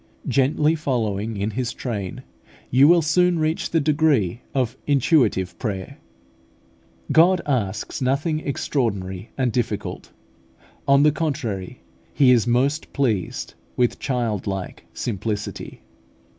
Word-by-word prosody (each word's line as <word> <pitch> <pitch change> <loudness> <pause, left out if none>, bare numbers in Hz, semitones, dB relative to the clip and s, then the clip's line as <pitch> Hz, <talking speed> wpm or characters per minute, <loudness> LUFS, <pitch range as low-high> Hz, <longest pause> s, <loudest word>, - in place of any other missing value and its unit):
Gently 150 +3 +2
following 115 -8 -2
in 100 +2 -1
His 120 +2 -2
train, 100 -7 -5 0.5
you 135 +3 +6
will 170 0 +5
soon 180 +3 +3
reach 155 +1 -1
the 165 - +2
degree 145 - +2
of 125 -4 -1
intuitive 120 - +2
prayer. 100 -6 -4 1.1
God 175 +3 +5
asks 110 -7 -2
nothing 140 +5 0
extraordinary 100 -10 -2
and 130 -3 +1
difficult: 110 -3 -3 0.8
on 140 +1 +5
the 150 - +5
contrary, 130 - -3 0.3
He 135 -3 +5
is 120 -2 +3
most 135 +6 +1
pleased 115 -10 -1 0.2
with 125 -1 +1
childlike 105 -7 -3
simplicity. 105 -1 -4
125 Hz, 110 wpm, -23 LUFS, 105-150 Hz, 1.1 s, you